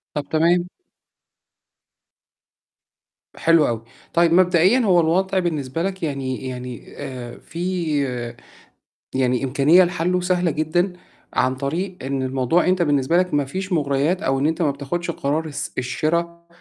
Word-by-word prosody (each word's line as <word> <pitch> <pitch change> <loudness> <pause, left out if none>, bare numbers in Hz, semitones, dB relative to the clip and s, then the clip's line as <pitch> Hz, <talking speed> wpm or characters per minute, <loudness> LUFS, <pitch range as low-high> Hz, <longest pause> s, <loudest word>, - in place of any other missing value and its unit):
طَب 145 - -2
تمام. 175 +3 +3 2.7
حلو 165 -2 +4
أوي، 115 -1 -2 0.3
طيب 170 0 +4
مبدئيًا 180 +6 +4
هو 190 -7 +4
الوضع 185 +4 +2
بالنسبة 160 -3 -2
لك 190 -1 -3
يعني 135 -3 -3
يعني 125 -1 -6
آآ 125 -2 -7
فيه 170 -4 -2 1.1
يعني 125 -1 +1
إمكانية 145 +7 +5
لحلّه 180 +1 0
سهلة 180 -1 +1
جدًا 175 +5 0 0.4
عن 130 0 +1
طريق 170 +8 -3
إن 135 0 -2
الموضوع 130 +6 +1
أنت 185 0 +2
بالنسبة 145 0 +2
لك 180 0 +1
ما 145 -1 +2
فيش 185 +7 -4
مُغريات 145 +3 +1
أو 135 0 0
إن 140 - +2
أنت 160 +2 -1
ما 150 - +2
بتاخُدش 160 +5 -3
قرار 155 +2 -1
الس 150 -3 -5
الشِرا 170 +7 -2
160 Hz, 135 wpm, -22 LUFS, 135-175 Hz, 2.7 s, إمكانية